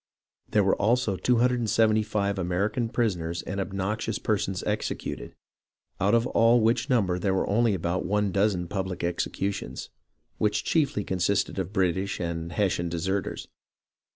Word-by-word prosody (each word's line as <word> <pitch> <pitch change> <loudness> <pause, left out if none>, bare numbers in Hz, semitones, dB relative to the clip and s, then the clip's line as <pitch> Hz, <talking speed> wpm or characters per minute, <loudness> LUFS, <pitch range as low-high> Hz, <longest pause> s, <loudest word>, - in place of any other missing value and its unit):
There 105 - +3
were 95 - +3
also 110 -2 +2
275 110 -2 +2
American 100 +6 0
prisoners 85 -8 -1
and 100 +1 -4
obnoxious 95 +3 -2
perso7is 100 -3 -1
executed, 105 0 -3 0.6
out 100 +3 +3
of 115 0 +3
all 115 0 +4
which 115 +4 +1
number 95 -8 +2
there 95 +1 +1
were - - 0
only 110 0 +2
about 85 +1 -1
one 105 +1 0
dozen 95 -3 +1
public 95 -2 -3
executions, 95 +3 -3 0.5
which 105 0 +1
chiefly 145 -8 +1
consisted 95 +2 0
of 95 0 -3
British 95 0 0
and 85 -1 -3
Hessian 90 -3 0
deserters. 95 +4 -2
100 Hz, 130 wpm, -27 LUFS, 95-110 Hz, 0.6 s, all